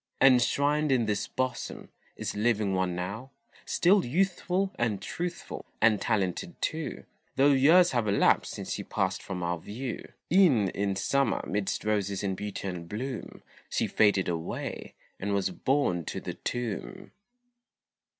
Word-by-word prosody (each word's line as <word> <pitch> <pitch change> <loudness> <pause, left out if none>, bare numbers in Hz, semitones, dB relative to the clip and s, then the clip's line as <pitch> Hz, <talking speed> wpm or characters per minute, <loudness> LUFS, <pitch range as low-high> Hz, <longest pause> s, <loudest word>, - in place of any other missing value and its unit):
Enshrined 140 +3 +4
in 125 -3 +3
this 105 -2 -1
bosom, 130 0 -3 0.3
is - - -4
living 105 -2 +1
one 95 -1 0
now, 100 +9 -5 0.4
Still 190 +3 +4
youthful 185 +5 0
and 115 -4 0
truthful, 175 - -5 0.2
and 110 -2 +4
talented 110 - -1
too, 160 -1 -3 0.3
Though 140 +2 +5
years 160 +7 +6
have 120 -4 0
elapsed 100 0 +3
since - - -6
she - - -4
passed 95 +1 -1
from 90 -2 -5
our 85 0 -1
view; 115 +8 -6 0.2
E'en 140 - +5
in 100 0 -1
Summer 140 +7 +1
midst 100 -1 -2
roses 100 -2 0
in 95 -1 0
beauty 100 0 -5
and 85 -3 -5
bloom, 125 +3 -5 0.3
She - - 0
faded 100 -3 +3
away, 85 -2 -4 0.2
and 100 +1 -1
was 95 -1 0
borne 110 -7 +1
to - - -4
the - - -5
tomb. 125 - -5
110 Hz, 140 wpm, -28 LUFS, 100-140 Hz, 0.4 s, years